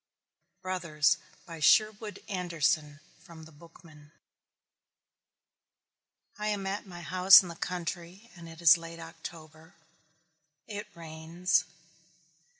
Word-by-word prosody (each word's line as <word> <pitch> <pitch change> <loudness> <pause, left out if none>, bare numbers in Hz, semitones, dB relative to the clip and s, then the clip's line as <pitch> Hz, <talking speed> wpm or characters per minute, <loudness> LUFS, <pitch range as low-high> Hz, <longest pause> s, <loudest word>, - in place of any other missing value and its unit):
BROTHERS 170 -5 +1 0.3
By 165 -1 -10
SHERWOOD 215 +5 +2
ANDERSON 165 -5 -1 0.2
(From 165 -3 -14
The 160 - -15
Bookman) 155 -1 -18 2.3
I 210 - -2
am 205 -2 -2
at 195 +2 -4
my 175 -2 -10
house 185 +5 +7
in 180 - -8
the 170 - -8
country 180 +5 -6
and 170 -1 -12
it 165 +1 -12
is 170 +1 +7
late 165 0 -10
October. 160 -1 -11 0.9
It 205 0 -7
rains. 165 +1 -1
170 Hz, 105 wpm, -29 LUFS, 160-185 Hz, 2.3 s, house